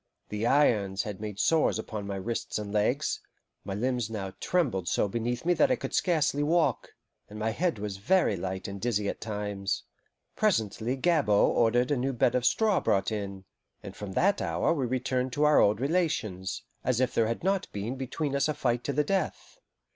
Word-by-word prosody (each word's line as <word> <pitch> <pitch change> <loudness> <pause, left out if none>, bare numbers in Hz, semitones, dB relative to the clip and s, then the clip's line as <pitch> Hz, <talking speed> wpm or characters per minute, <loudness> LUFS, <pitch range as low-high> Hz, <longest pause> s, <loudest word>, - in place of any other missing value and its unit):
The 105 +2 -1
irons 105 -9 +3
had 105 -2 -6
made 105 -2 -5
sores 155 +3 +3
upon 110 -2 -5
my 100 - -3
wrists 105 +5 -3
and 105 -1 -5
legs, 125 +8 +1 0.4
my 95 -1 -4
limbs 120 0 -1
now 95 -4 -5
trembled 125 - 0
so - - +1
beneath 120 +5 -3
me 175 - +4
that 275 +10 +3
I 255 - +3
could - - -6
scarcely 155 -5 +2
walk, 155 -4 +1 0.3
and 105 - -9
my 110 +1 -1
head 170 +4 0
was 100 -1 -4
very 140 - +2
light 95 +1 -4
and 100 -1 -7
dizzy 105 -4 0
at - - -5
times. 105 -2 -3 0.5
Presently 115 - 0
Gabord 135 -10 +3
ordered 120 +3 +3
a 145 - +2
new 135 +2 -1
bed 120 0 +2
of 125 -1 0
straw 215 - +3
brought 100 +1 +1
in; 100 -2 -5 0.4
and - - -8
from 100 -2 -7
that 200 - +2
hour - - +1
we 135 -6 -1
returned 125 0 -1
to 145 - +1
our 150 0 +6
old 105 +1 +4
relations, 130 - -1 0.2
as 125 -2 +1
if 130 -1 +1
there 115 - +2
had 115 +6 -3
not 195 0 0
been 105 +5 -4
between 135 +2 -3
us 140 +1 +2
a 155 - -1
fight 120 -1 0
to 140 - -1
the 150 +2 +2
death. 195 - -2
120 Hz, 195 wpm, -28 LUFS, 105-145 Hz, 0.5 s, our